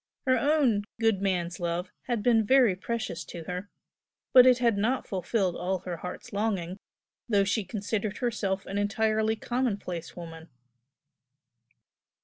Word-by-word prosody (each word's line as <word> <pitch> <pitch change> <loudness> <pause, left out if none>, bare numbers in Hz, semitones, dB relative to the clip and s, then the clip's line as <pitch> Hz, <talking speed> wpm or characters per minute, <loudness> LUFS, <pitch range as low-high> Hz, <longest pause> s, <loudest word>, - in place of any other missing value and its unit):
Her 260 -1 +4
own 255 -6 +2
"good 225 -4 +2
man's 180 -3 -1
love" 175 +1 -2 0.2
had 235 -4 -1
been 230 -2 +4
very 245 -3 +5
precious 195 -4 -4
to 170 -2 -8
her, 180 +4 -5 0.6
but 255 -1 +9
it 250 -1 +6
had 235 -3 +2
not 230 +6 0
fulfilled 190 -1 -1
all 185 +1 -1
her 180 -2 -5
heart's 180 +8 -8
longing, 195 -4 -1 0.5
though 200 -3 +4
she 205 +2 0
considered 205 +2 -3
herself 210 -6 -1
an 200 +1 -3
entirely 220 +1 +1
commonplace 205 -9 -3
woman. 165 -1 -9
205 Hz, 135 wpm, -28 LUFS, 180-230 Hz, 0.6 s, but